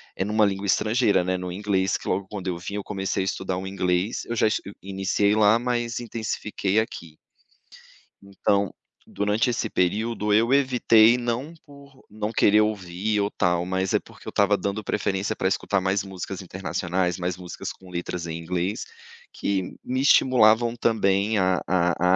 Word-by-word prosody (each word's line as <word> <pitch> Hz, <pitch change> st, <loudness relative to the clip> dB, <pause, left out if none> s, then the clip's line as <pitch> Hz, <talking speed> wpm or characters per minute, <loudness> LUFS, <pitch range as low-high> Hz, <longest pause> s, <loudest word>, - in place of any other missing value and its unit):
eh, 95 Hz, -, -1 dB
numa 105 Hz, +1 st, +3 dB
língua 100 Hz, 0 st, -2 dB
estrangeira, 110 Hz, -1 st, +2 dB
né, 95 Hz, +1 st, 0 dB
no 90 Hz, 0 st, -5 dB
inglês 95 Hz, 0 st, 0 dB
que, -, -, -11 dB
logo 95 Hz, +1 st, -1 dB
quando 100 Hz, -3 st, -6 dB
eu 90 Hz, -2 st, -1 dB
vim, 100 Hz, +3 st, -6 dB
eu 105 Hz, -, -3 dB
comecei 95 Hz, -1 st, -2 dB
a -, -, -3 dB
estudar 95 Hz, -1 st, -2 dB
o 95 Hz, -, -5 dB
inglês, 90 Hz, +1 st, -1 dB
eu 120 Hz, -, -4 dB
já 110 Hz, -, +2 dB
es 110 Hz, -, 0 dB, 0.2 s
iniciei 100 Hz, +1 st, +1 dB
lá, 110 Hz, +1 st, +5 dB
mas 120 Hz, -1 st, -2 dB
intensifiquei 110 Hz, -3 st, -2 dB
aqui. 85 Hz, -8 st, -5 dB, 1.1 s
Então, 100 Hz, 0 st, 0 dB, 0.3 s
durante 105 Hz, +4 st, 0 dB
esse 115 Hz, -1 st, -1 dB
período, 105 Hz, +3 st, 0 dB
eu 115 Hz, +5 st, +3 dB
evitei 125 Hz, -4 st, +5 dB
não 120 Hz, +6 st, -3 dB
por 140 Hz, -2 st, -17 dB
não 105 Hz, +1 st, -4 dB
querer 105 Hz, -1 st, +4 dB
ouvir 105 Hz, 0 st, -1 dB
ou 100 Hz, -, 0 dB
tal, 90 Hz, 0 st, +1 dB
mas 95 Hz, +1 st, -1 dB
é -, -, +4 dB
porque -, -, -17 dB
eu -, -, -4 dB
estava 100 Hz, 0 st, +3 dB
dando 100 Hz, +2 st, -3 dB
preferência 100 Hz, +1 st, -1 dB
para -, -, 0 dB
escutar 95 Hz, +1 st, 0 dB
mais 95 Hz, +1 st, 0 dB
músicas 95 Hz, 0 st, -6 dB
internacionais, 90 Hz, 0 st, -2 dB
mais 90 Hz, 0 st, -2 dB
músicas 90 Hz, -1 st, -7 dB
com 95 Hz, -, -15 dB
letras 90 Hz, -1 st, -4 dB
em 80 Hz, 0 st, -4 dB
inglês, 90 Hz, +5 st, -3 dB, 0.5 s
que 95 Hz, -2 st, -2 dB
me 130 Hz, +1 st, -1 dB
estimulavam, 120 Hz, -4 st, +4 dB
também 105 Hz, -2 st, +1 dB
a 95 Hz, -1 st, +2 dB
a 90 Hz, 0 st, +2 dB
100 Hz, 170 wpm, -24 LUFS, 95-110 Hz, 1.1 s, lá